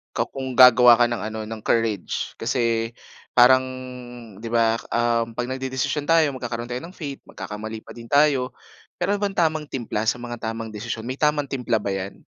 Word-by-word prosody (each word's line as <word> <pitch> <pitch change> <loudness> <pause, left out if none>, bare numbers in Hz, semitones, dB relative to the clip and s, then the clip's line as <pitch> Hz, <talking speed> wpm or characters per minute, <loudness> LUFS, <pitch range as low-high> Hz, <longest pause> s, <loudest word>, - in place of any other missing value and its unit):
Ka - - +1
kung 130 -2 -6
gagawa 125 -1 +8
ka 120 - +5
ng 120 -1 -2
ano, 110 +1 -4
ng 110 0 -7
courage. 110 -4 -1
Kasi 115 -2 0 0.5
parang, 130 +1 +7 0.8
'di 115 - -5
ba 115 -1 +3 0.2
uhm, 115 -1 0
'pag 120 0 -1
nagdedesisyon 130 +3 -2
tayo 165 -1 +5
magkakaroon 120 -2 -4
tayo 125 +1 -3
ng 180 +3 -10
faith, 140 -4 -6
magkakamali 110 +1 -7
pa - - -11
din 115 -1 -11
tayo. 140 -3 +3 0.5
Me'ron 205 0 0
bang 200 -1 -2
tamang 155 -2 +1
timpla 115 -4 -3
sa 125 - -1
mga 120 0 -6
tamang 115 -1 -6
desisyon? 110 +1 -5
May 130 - -3
tamang 150 0 +1
timpla 125 -4 0
ba 105 - -6
yan? 95 0 -5
120 Hz, 180 wpm, -23 LUFS, 115-135 Hz, 0.8 s, gagawa